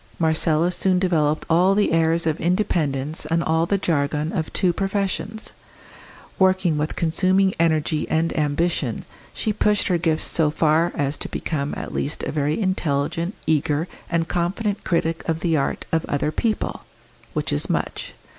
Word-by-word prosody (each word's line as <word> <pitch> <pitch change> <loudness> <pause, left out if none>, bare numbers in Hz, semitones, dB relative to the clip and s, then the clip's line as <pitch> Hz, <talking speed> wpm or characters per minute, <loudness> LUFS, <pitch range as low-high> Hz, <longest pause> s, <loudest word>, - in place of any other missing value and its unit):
Marcella 160 +1 +2
soon 185 0 +1
developed 155 -5 +1
all 180 +4 +4
the 205 - +2
airs 165 0 +2
of 160 -1 0
independence 160 -6 0
and 165 +1 +1
all 160 +1 +1
the 200 - +2
jargon 150 -3 0
of 160 -5 -2
two 180 -2 +1
professions. 200 +3 -2 0.9
Working 190 -3 +3
with 150 +1 -2
consuming 185 +4 +2
energy 155 -1 +1
and 165 +1 0
ambition, 155 +3 0 0.3
she 215 - -2
pushed 210 0 +2
her 175 -2 +2
gifts 160 -2 +1
so 160 -3 +2
far 160 +2 +2
as 140 +1 -1
to - - -5
become 145 -3 -3
at - - -6
least 145 - -2
a - - -2
very 150 +2 0
intelligent, 170 -2 -1
eager, 155 +1 +1 0.2
and 170 -1 0
confident 195 +5 -1
critic 165 -1 0
of 165 0 -1
the 165 -2 +1
art 140 - -1
of 165 -1 +1
other 145 +1 0
people 220 +6 -1 0.5
which - - -1
is - - -1
much. - - -2
165 Hz, 155 wpm, -22 LUFS, 155-185 Hz, 0.9 s, all